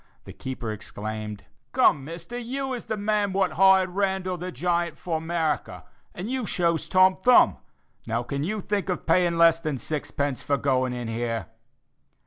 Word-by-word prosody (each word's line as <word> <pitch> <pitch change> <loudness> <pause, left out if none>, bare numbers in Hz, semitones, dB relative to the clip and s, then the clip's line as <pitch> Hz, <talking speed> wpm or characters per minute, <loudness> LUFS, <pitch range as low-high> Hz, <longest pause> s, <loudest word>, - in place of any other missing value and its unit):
the - - -10
keeper 125 -4 -5
exclaimed: 105 0 -6 0.3
"Come, 140 - +4
Mister, 170 - -8
you 260 +3 -3
is 245 - -5
the 220 -1 -3
man 205 -1 0
what 190 -2 +1
hired 190 +2 +5
Randall, 190 -1 -1
the 180 +1 -5
giant, 170 +4 -1
for 165 -3 -3
'Merika, 160 -3 -2 0.3
and 180 +4 -5
you 255 -2 -2
shows 170 -2 0
Tom 185 0 +5
Thumb; 250 -1 +6 0.5
now 115 +1 -1
can 140 +3 -3
you 210 +5 -2
think 200 0 -2
of 180 - -2
paying 170 0 +3
less 165 -1 +6
than 155 -4 -3
sixpence 145 -1 -3
for 140 - 0
going 130 -2 +1
in 120 -1 -4
here?" 115 0 -3
170 Hz, 165 wpm, -25 LUFS, 140-190 Hz, 0.5 s, Thumb